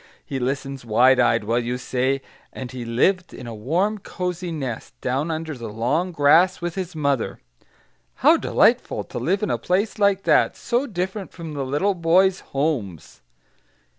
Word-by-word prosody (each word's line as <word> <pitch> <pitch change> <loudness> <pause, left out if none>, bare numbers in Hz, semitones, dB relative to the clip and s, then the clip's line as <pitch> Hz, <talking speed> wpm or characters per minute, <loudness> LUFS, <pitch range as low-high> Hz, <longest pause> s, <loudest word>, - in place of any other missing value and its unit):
He 135 -3 -4
listens 135 +1 -3
wide 125 +3 +4
eyed, 115 -3 +3
while 115 +3 +1
you 120 +1 -2
say, 130 +2 -1 0.3
"and 130 -2 -7
he 125 -2 -6
lived 180 +11 +1
in - - -9
a 120 - -6
warm, 175 - 0
cosy 180 -2 -4
nest, 135 -8 -5
down 135 +6 -1
under 160 -1 -3
the 120 -3 -7
long 130 - -1
grass 160 +4 +4
with 175 0 -3
his 180 -2 -5
mother" 140 -5 -1 0.9
how - - +8
delightful, - - +2
to - - -6
live 195 +4 0
in 210 - 0
a - - -1
place 200 +5 0
like 200 -1 +3
that; - - +3
so 245 +4 -1
different 190 0 -4
from 165 -3 -8
little 145 +8 0
boys' 185 +2 +3
homes! 135 - -3
150 Hz, 165 wpm, -23 LUFS, 125-180 Hz, 0.9 s, how